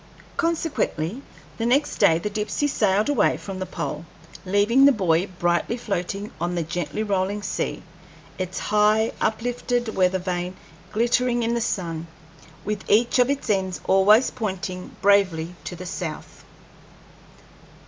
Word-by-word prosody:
Consequently 290 - -1 0.4
the 225 - 0
next 280 +4 +2
day 160 - +5
the 170 - -3
Dipsey 215 +6 -1
sailed 210 -6 +2
away 290 - +2
from 195 -2 -7
the 185 - -4
pole, 150 - -4 0.4
leaving 205 +7 +4
the 280 - +8
buoy 185 -5 +1
brightly 175 +5 0
floating 200 -1 -3
on 175 +1 -1
a 170 - 0
gently 175 +5 -3
rolling 200 0 -1
sea, - - -3 0.6
its 185 0 -3
high 215 +1 +3
uplifted 240 +1 -1
weather 185 0 +3
vane 180 0 -3 0.4
glittering 240 +2 +1
in 230 +1 0
the 235 - 0
sun, 170 -7 -2 0.6
with 210 -1 -3
each 235 +4 +4
of 250 +1 +4
its 280 -2 -2
ends 190 -4 0
always 210 +6 +5
pointing 190 -5 -5
bravely 185 -5 +3
to 180 - -5
the 180 +2 -8
south. 175 -3 -6
200 Hz, 140 wpm, -24 LUFS, 180-230 Hz, 0.6 s, the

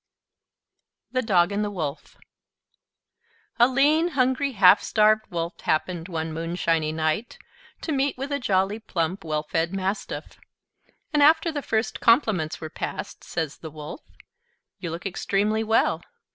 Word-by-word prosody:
THE 255 - +1
DOG 190 -5 +3
AND 205 +1 0
THE 210 - -1
WOLF 160 -7 -5 1.4
A 240 - +7
lean, 290 +6 +3
hungry, 260 +2 +2
half 195 -2 +7
starved 215 0 +3
Wolf 170 0 -4
happened, 165 +1 -1
one 160 -2 -3
moonshiny 165 -1 0
night, 155 +8 -1 0.4
to 320 - -3
meet 275 -1 0
with 275 +3 -5
a 285 - 0
jolly, 200 -2 +1
plump, 180 -4 -2
well 155 -2 -2
fed 165 +4 -1
Mastiff; 195 +2 -4 0.7
and 295 - +3
after 320 +3 +5
the 295 -2 -3
first 220 -3 -1
compliments 220 - +2
were 160 - -5
passed, - - -6
says 160 -3 -4
the 160 - -7
Wolf: 150 - -8 0.8
"You 175 -3 -4
look 170 +4 -6
extremely 205 +3 0
well. 225 +1 +2
195 Hz, 140 wpm, -25 LUFS, 165-240 Hz, 1.4 s, A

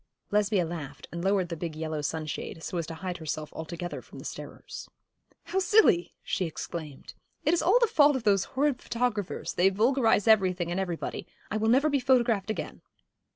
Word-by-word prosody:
Lesbia 205 -3 +2
laughed, 155 -4 -7
and 170 +1 -5
lowered 190 -2 +2
the 170 - -3
big 165 -1 -5
yellow 155 -1 -3
sunshade, 155 +1 -4
so - - -5
as 165 - -3
to 165 - -6
hide 180 +1 -4
herself 155 -1 -4
altogether 170 +2 -5
from - - -14
the - - -9
starers. - - -8 0.5
'How 385 - -1
silly!' 370 - +4
she 190 - -1
exclaimed. 155 -3 -7 0.3
'It 305 - +4
is 345 - +2
all 385 +7 +5
the - - +5
fault 295 -8 +5
of 260 - -2
those 200 -3 +3
horrid 275 -1 0
photographers: 230 -5 -2
they 185 +2 +4
vulgarise 225 +1 +2
everything 185 -5 +3
and 175 - -1
everybody. 175 -2 -4 0.2
I 215 - 0
will 220 +1 +1
never 265 +6 +4
be 285 -2 +2
photographed 240 -5 +2
again.' 215 - -4
195 Hz, 185 wpm, -28 LUFS, 170-245 Hz, 0.5 s, all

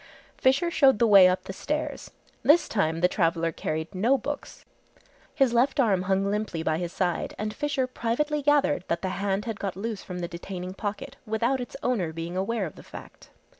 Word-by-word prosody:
Fisher 275 +7 +2
showed 270 -7 +5
the 235 - +3
way 200 -4 +8
up 185 0 0
the 190 - -7
stairs. 300 +9 -4 0.3
This 330 +4 +5
time 165 -6 0
the 180 - +5
traveller 165 -2 0
carried 160 +3 -4
no 230 +9 +2
books. 285 +4 -6 0.7
His 270 -5 +3
left 250 +4 +2
arm 205 -8 +3
hung 190 +1 +1
limply 205 -6 -2
by 160 0 0
his 175 -1 -3
side 175 -2 -2
and 215 0 -3
Fisher 285 -1 -1
privately 255 +5 -1
gathered 290 -7 +2
that 170 +2 -2
the 190 - 0
hand 195 +1 -2
had 225 -3 -4
got 195 -3 -3
loose 215 +1 -4
from 180 - -7
the 175 -1 -3
detaining 180 +1 -6
pocket 215 +7 -5
without 235 +4 0
its 245 - -7
owner 210 -10 0
being 165 +2 -6
aware 200 +2 -1
of 155 - -9
the - - -10
fact. - - -12
205 Hz, 195 wpm, -26 LUFS, 180-255 Hz, 0.7 s, way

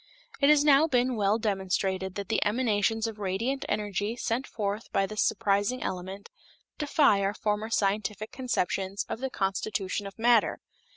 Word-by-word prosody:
It 280 - +4
has 300 -1 +6
now 295 +1 +5
been 250 -3 +1
well 205 0 +2
demonstrated 190 -2 -1
that 200 -2 -4
the - - +1
emanations 225 -1 +1
of 220 -2 -5
radiant 220 +8 -2
energy 210 +1 -1
sent 240 +2 -2
forth 210 0 -4
by 195 - +2
this 215 +1 -2
surprising 205 +4 +1
element 190 +2 -5 0.5
defy 285 -8 +3
our 200 +1 0
former 210 +1 -1
scientific 210 0 -1
conceptions 195 -6 -2
of - - -4
the 265 +1 -2
constitution 195 -1 -2
of 195 - -11
matter. 230 -1 +3
210 Hz, 155 wpm, -28 LUFS, 195-235 Hz, 0.5 s, has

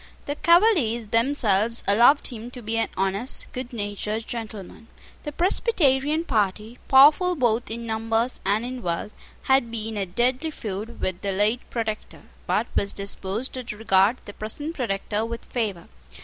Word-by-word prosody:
The 285 - -2
Cavaliers 305 - +3
themselves 230 -3 +2
allowed 240 +8 +5
him 235 -2 -6
to 245 -1 -9
be 220 +1 -2
an 225 - +1
honest, 195 +7 -1
good 255 0 -6
natured 210 0 -3
gentleman. 225 -2 -7 0.3
The 295 - -5
Presbyterian 310 - +2
party, 215 - -1
powerful 300 +7 +6
both 240 -4 +1
in 230 +1 -5
numbers 225 +2 -1
and 210 +4 +1
in 255 0 -5
wealth, 175 +2 -3 0.3
had 265 -3 +3
been 220 -1 -4
at 190 -2 -5
deadly 255 +6 +1
feud 215 -4 -6
with 185 -1 -2
the 200 - -1
late 210 +5 +2
Protector, 220 -2 -4 0.2
but - - +1
was 200 - +1
disposed 200 +4 -3
to 245 -5 -5
regard 205 +2 +3
the 205 - -9
present 290 +11 -4
Protector 210 -5 -2
with 230 +1 -5
favour. 210 -8 -3
230 Hz, 150 wpm, -24 LUFS, 210-260 Hz, 0.3 s, powerful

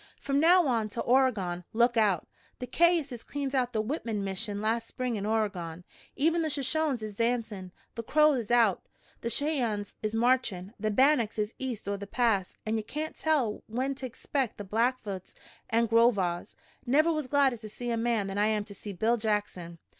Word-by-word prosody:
"From 275 0 0
now 345 +3 +6
on 230 -5 0
to 230 - -4
Oregon 220 -9 +1
look 235 +2 +3
out! 205 -7 +2 0.3
The 250 - -5
Cayuses 315 -6 +2
cleaned 285 -1 -4
out 250 -2 +1
the 215 -3 0
Whitman 225 -5 -3
mission 200 +2 -3
last 225 +2 0
spring 250 -2 -3
in 205 0 -3
Oregon. 185 -6 -2 0.3
Even 330 +4 +2
the 315 - 0
Shoshones 280 -2 0
is 215 -1 -5
dancin'. 225 -4 -2 0.2
The 230 - -4
Crows 300 +3 +4
is 225 - -6
out, 230 -5 +3 0.4
the 235 - -3
Cheyennes 235 -6 -1
is 215 0 -2
marchin', 230 -5 +1
the 215 +1 0
Bannocks 240 0 +3
is 210 +1 -1
east 250 -6 -4
o' 200 0 -1
the 200 0 -8
Pass, 210 -5 0
an' 220 +1 0
ye - - -1
kain't 305 +8 -5
tell 275 -9 0
when 255 +5 -1
ter 265 -1 -6
expeck 255 0 -3
the 205 - -6
Blackfoots 215 -2 -2 0.3
an' 230 +1 +3
Grow 230 +1 +5
Vaws. 180 -5 -3 0.3
Never 305 +7 +3
was 305 -4 -2
gladder 275 -2 +3
to 215 -1 -9
see 240 +3 -5
a - - +1
man 230 -2 0
than 195 +1 -3
I 210 - +3
am 215 -1 +1
to 205 -1 -11
see 200 +1 -8
Bill 225 +6 +1
Jackson." 205 -6 -2
230 Hz, 190 wpm, -29 LUFS, 210-260 Hz, 0.4 s, now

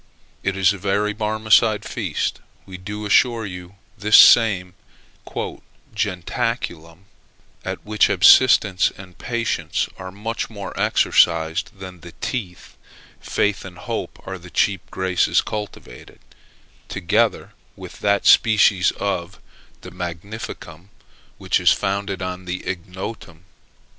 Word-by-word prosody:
It 100 -1 -2
is 95 0 +4
a 100 - -8
very 100 +2 0
Barmecide 110 0 +2
feast, - - -3 0.3
we 95 - -10
do 105 +3 -7
assure 115 +2 +3
you 90 0 -9 0.2
this 105 +1 +5
same 95 -6 +6 1.2
"jentaculum;" 95 -4 -3 0.6
at - - -6
which 105 0 +2
abstinence 105 -8 +5
and 95 -2 -13
patience 120 -1 -2
are 95 -1 -7
much 115 +4 -4
more 100 -3 -7
exercised 85 +3 +2
than 95 -2 -10
the 85 +1 -12
teeth: 95 -9 -6 0.4
faith 105 -1 -1
and 90 -2 -11
hope - - -5
are 95 -1 -6
the 90 +1 -13
chief 95 +3 +1
graces 95 -1 +1
cultivated, 105 -12 -8 0.7
together 90 -4 0 0.2
with - - -11
that 100 -1 +1
species 105 -5 +5
of 100 -2 -3 0.4
the - - -10
magnificum 90 -1 -8 0.5
which - - 0
is - - +4
founded 100 -1 -2
on 90 0 -5
the 90 +1 -5
ignotum. 90 -1 -7
95 Hz, 115 wpm, -21 LUFS, 90-105 Hz, 1.2 s, same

